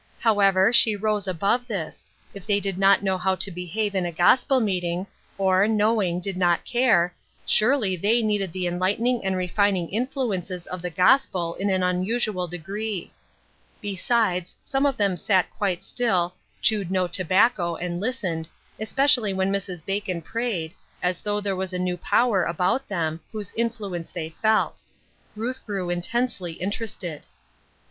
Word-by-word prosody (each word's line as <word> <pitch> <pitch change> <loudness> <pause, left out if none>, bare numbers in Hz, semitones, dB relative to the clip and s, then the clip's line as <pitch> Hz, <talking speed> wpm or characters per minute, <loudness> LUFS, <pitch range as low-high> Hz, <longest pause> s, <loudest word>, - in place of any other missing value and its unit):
However, 200 -2 +4
she 220 -3 +6
rose 210 -1 -1
above 200 +8 0
this; 190 -9 -5 0.3
if 200 -1 -10
they 205 -1 +3
did 195 -2 -3
not 195 +1 +5
know 190 -1 0
how 190 +1 +1
to 195 - -1
behave 190 +4 -3
in 190 -2 0
a 175 - -2
gospel 255 - +4
meeting, 180 -4 -1 0.3
or, 190 +1 +3
knowing, 210 -5 +2
did 190 +1 -4
not 175 -2 +2
care, 215 -9 +3 0.3
surely 215 -4 +3
they 220 +6 +2
needed 205 -4 0
the 185 +1 -3
enlightening 200 +8 0
and 190 -1 0
refining 185 -1 +1
influences 200 - -2
of 185 -1 -6
the 180 - -3
gospel 180 -2 +2
in 200 +3 -2
an 190 -1 +1
unusual 185 +1 0
degree. 195 +4 -5 0.7
Besides, 195 -2 0
some 275 +1 +1
of 275 - -1
them 200 -3 +1
sat 185 0 +1
quite 190 -4 -1
still, 185 -8 +1 0.3
chewed 210 -5 +2
no 185 -1 +1
tobacco, 185 +1 +2
and 175 +1 -4
listened, 190 -9 -2 0.3
especially 235 -2 +2
when 190 +1 0
Mrs. 185 -4 -3
Bacon 195 -4 -2
prayed, 205 -7 -3 0.3
as 180 -1 0
though 210 0 -1
there 200 -2 -1
was 190 0 -3
a - - -1
new 180 0 -1
power 210 +1 +2
about 180 +11 0
them, 165 -4 -2
whose 210 -3 -5
influence 215 -7 -3
they 160 -2 -5
felt. 220 0 +2 0.5
Ruth 245 +4 -4
grew 195 -4 -3
intensely 180 0 -2
interested. 185 -3 -4
195 Hz, 155 wpm, -24 LUFS, 180-220 Hz, 0.7 s, she